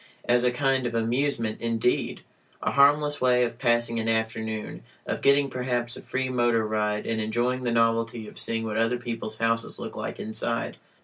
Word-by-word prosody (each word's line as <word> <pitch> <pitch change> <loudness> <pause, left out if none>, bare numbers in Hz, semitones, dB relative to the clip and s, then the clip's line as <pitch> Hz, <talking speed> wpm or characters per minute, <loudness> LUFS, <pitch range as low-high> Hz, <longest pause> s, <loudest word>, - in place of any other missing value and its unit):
As 120 0 +3
a 125 - +4
kind 130 0 +1
of 115 - -4
amusement, 115 -1 0
indeed! 115 +1 0 0.4
A - - +1
harmless 145 +2 +4
way 125 -1 +4
of 120 0 -3
passing 120 -2 +2
an 115 0 -1
afternoon, 110 -1 -2 0.2
of - - -3
getting 140 +1 +4
perhaps 125 -2 -2
a - - -8
free 130 0 -2
motor 120 -3 +2
ride 105 -1 -1
and 110 -1 -1
enjoying 120 +4 -1
the 120 - +1
novelty 115 -1 +1
of - - -10
seeing 115 0 0
what 110 -1 -3
other 115 +2 +2
people's 115 -2 -5
houses 115 0 0
look - - -6
like - - -5
inside. 115 +1 -3
115 Hz, 180 wpm, -26 LUFS, 115-125 Hz, 0.4 s, a